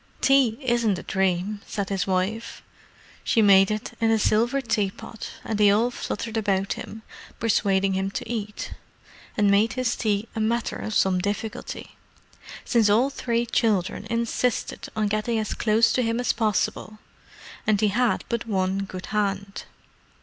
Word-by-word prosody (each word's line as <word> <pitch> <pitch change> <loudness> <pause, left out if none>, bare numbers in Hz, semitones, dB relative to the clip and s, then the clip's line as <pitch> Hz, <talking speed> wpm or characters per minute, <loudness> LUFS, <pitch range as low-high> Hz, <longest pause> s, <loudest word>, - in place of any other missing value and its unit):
"Tea 270 -5 +4
isn't 235 -5 +1
a - - -7
dream," 190 +2 -1
said 200 -2 -3
his 195 -2 -1
wife. 195 +5 -2 0.6
She - - +2
made 195 -1 +6
it 215 0 -3
in 225 - +3
the 225 - +4
silver 235 +5 +2
tea 215 -6 0
pot, 215 +3 -9
and 215 -2 -3
they 205 -1 +6
all 225 +5 +3
fluttered 225 -1 -4
about 195 -2 0
him, 220 0 -9 0.4
persuading 195 -3 +2
him 190 +1 -1
to 195 - -5
eat: 210 -3 -4 0.6
and 205 -2 +4
made 215 +3 +3
his 255 -3 0
tea 210 -1 -1
a - - -2
matter 230 +2 0
of 215 - -4
some 185 -1 +3
difficulty, 205 +3 -5 0.7
since 230 -4 +3
all 240 +7 +3
three 235 -3 -1
children 210 -3 0
insisted 235 +1 -1
on 215 -1 +1
getting 215 +3 0
as 215 -1 -2
close 225 +1 +3
to 255 - +2
him 230 0 0
as 245 - +1
possible, 215 -1 -1 0.7
and 215 -2 +3
he 215 - +3
had 240 +3 +1
but 235 -1 -3
one 190 -2 0
good 185 -1 -7
hand. 200 -1 -2
215 Hz, 160 wpm, -25 LUFS, 200-230 Hz, 0.7 s, made